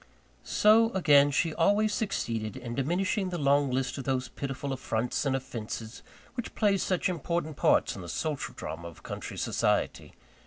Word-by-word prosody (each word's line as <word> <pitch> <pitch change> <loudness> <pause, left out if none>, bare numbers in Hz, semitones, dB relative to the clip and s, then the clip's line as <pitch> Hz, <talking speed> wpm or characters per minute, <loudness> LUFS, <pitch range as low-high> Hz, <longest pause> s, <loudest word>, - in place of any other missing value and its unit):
So, 225 +2 +5
again, 145 -6 +5
she 155 +3 +1
always 205 +6 +3
succeeded 115 - -2
in 120 -2 -6
diminishing 185 - 0
the 175 - -3
long 140 -1 +3
list 130 +1 -1
of - - -4
those 130 -1 -1
pitiful 135 0 -4
affronts 125 +1 -1
and 135 - +1
offences, 115 -3 -6 0.3
which 245 -2 -6
play 205 -2 +3
such 185 -1 0
important 170 -2 -2
parts - - +3
in - - -7
the 85 - -8
social 150 - -3
drama 85 +1 -6
of 85 - -13
country - - -6
society. - - 0
140 Hz, 160 wpm, -29 LUFS, 125-180 Hz, 0.3 s, So